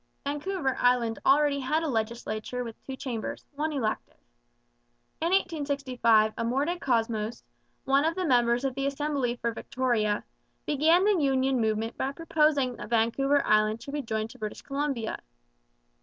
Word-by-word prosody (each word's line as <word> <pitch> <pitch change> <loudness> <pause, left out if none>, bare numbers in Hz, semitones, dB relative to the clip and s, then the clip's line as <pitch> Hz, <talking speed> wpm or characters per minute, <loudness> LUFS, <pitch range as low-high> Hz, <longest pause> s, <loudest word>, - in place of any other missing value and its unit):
Vancouver 295 0 -1
Island 240 -2 +2
already 285 0 +4
had 305 +5 0
a - - -1
legislature 230 0 -3
with 230 -2 -9
two 265 - -6
chambers, 250 -5 -5
one 300 +2 -2
elective. 235 -7 -3 1.0
In 330 - +1
1865 275 - +2
Amor 250 +5 +1
DeCosmos, 235 -9 -1 0.4
one 275 +1 +3
of 325 +1 +1
the 370 - -1
members 240 -3 +3
of 270 - 0
the 275 +1 -1
Assembly 280 -3 -1
for 235 -1 -2
Victoria, 230 -4 -1 0.4
began 320 +6 +3
the 410 -5 +3
union 265 -2 +2
movement 220 +1 -1
by 270 - 0
proposing 300 -5 +1
that - - -8
Vancouver 255 +5 +2
Island 215 +1 +2
should 280 - -8
be 295 - -1
joined 220 -2 -3
to - - -15
British 215 -1 -6
Columbia. 275 -5 -2
265 Hz, 145 wpm, -28 LUFS, 230-290 Hz, 1.0 s, already